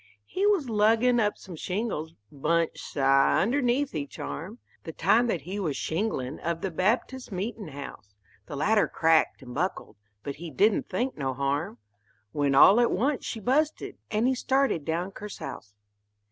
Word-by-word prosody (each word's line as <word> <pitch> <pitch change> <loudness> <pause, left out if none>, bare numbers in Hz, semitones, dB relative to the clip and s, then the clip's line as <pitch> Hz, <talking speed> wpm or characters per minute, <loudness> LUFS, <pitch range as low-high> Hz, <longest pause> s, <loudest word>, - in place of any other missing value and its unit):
He 390 +2 0
was 385 -10 +2
luggin' 225 +3 +3
up 210 -2 +1
some 185 -3 -10
shingles, 180 -3 -3 0.2
bunch, 165 +3 0
sah, 135 0 +3
underneath 260 +4 +1
each 145 -3 -5
arm, 190 +9 -6 0.3
The 160 - -7
time 220 +10 +3
that 180 -8 -1
he 185 +8 -5
was 160 -8 -2
shinglin' 160 - -2
of 170 0 -3
the 195 - -2
Baptist 230 +8 -1
meetin' 205 +2 -4
house; 135 -8 -10 0.3
The 145 - -6
ladder 210 +9 +2
cracked 160 -3 +2
and 125 -1 -9
buckled, 175 - -3 0.3
but 140 0 -5
he 170 +2 -7
didn't 200 - +2
think 240 +2 -2
no 135 -2 -2
harm, 140 0 -2 0.5
When 140 0 +1
all 195 +10 +8
at 240 - +4
once 265 +7 0
she 225 - -4
busted, 295 +8 0
and 215 +2 +1
he 260 - +3
started 260 - +1
down 170 +4 -2
kersouse. 195 - -8
185 Hz, 160 wpm, -27 LUFS, 150-235 Hz, 0.5 s, all